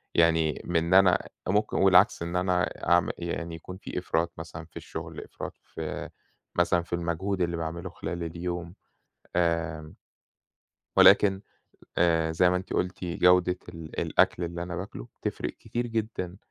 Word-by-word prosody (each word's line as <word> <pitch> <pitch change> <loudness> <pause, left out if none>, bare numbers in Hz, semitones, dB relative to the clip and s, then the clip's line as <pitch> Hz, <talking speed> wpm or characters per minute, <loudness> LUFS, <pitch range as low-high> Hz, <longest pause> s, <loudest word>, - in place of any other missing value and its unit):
يعني 80 -2 +3
من 85 0 +1
أنا 95 -1 +5 0.2
ممكن 105 +3 +1
والعكس، 95 0 +5
إن 85 +1 -3
أنا 90 0 +2 0.3
أعم 85 0 +4
يعني، 85 -1 -4
يكون 90 +3 -9
في 95 - -5
إفراط 85 -1 0
مثلًا 80 0 -8
في 85 - -13
الشغل، - - -7
إفراط - - -8
في - - -6 0.5
مثلًا 85 0 +3
في 85 - -9
المجهود 85 +3 -1
اللي 85 -1 0
باعمله 85 +1 -4
خلال 85 -1 -5
اليوم. 85 +1 -4 0.6
آمم، 85 -2 0 1.0
ولكن 95 -2 +7 0.6
آآ، 80 -2 +3
زي 90 +2 +4
ما 90 - +2
أنتِ 95 +1 -5
قُلتِ، 90 0 -1
جودة 90 +1 +3
ال 80 -3 -6
الأكل 90 - +2
اللي 85 0 -4
أنا 90 0 -5
باكله، 90 -10 -7
بتفرِّق - - -2
كتير 120 0 -4
جدًا 110 -5 -3
85 Hz, 145 wpm, -28 LUFS, 85-90 Hz, 1.0 s, ولكن